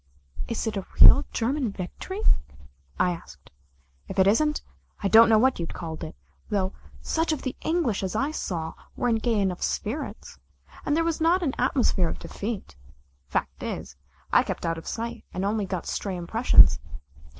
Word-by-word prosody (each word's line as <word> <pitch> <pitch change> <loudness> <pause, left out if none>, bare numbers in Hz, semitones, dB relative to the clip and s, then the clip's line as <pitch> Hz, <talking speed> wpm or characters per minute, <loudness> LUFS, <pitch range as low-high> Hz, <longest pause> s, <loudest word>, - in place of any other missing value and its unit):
"Is 230 - -2
it 220 -2 -2
a 195 - -5
real 280 - +9
German 250 0 -1
victory?" 375 - -6 0.8
I 180 - +3
asked. 75 - -10 0.6
"If 190 - -7
it 190 - +5
isn't 300 +10 +2 0.4
I - - +3
don't 225 +3 +7
know 220 - +6
what 260 +1 +3
you'd 170 - -5
call 165 -2 -5
it, 160 - -7 0.3
though 195 -3 0 0.3
such 325 0 0
of 310 - -2
the 260 - -3
English 320 - 0
as 190 -2 -3
I 275 +3 0
saw 165 - -4 0.2
were 245 - 0
in 225 - +2
gay 225 -1 0
enough 190 -3 -1
spirits, 255 +9 -4 0.5
and 295 +1 +2
there 330 - +2
was 330 -1 -1
not 350 +3 +3
an 275 -5 0
atmosphere 245 -9 +2
of - - -5
defeat. 205 - -6 0.5
Fact - - -3
is 65 - -5 0.4
I - - +7
kept - - -4
out 165 0 -1
of 165 - -13
sight 230 0 -4
and 185 +2 -1
only 205 -1 0
got 185 -3 -4
stray 195 -2 -3
impressions. 220 +8 +5
220 Hz, 175 wpm, -26 LUFS, 185-265 Hz, 0.8 s, real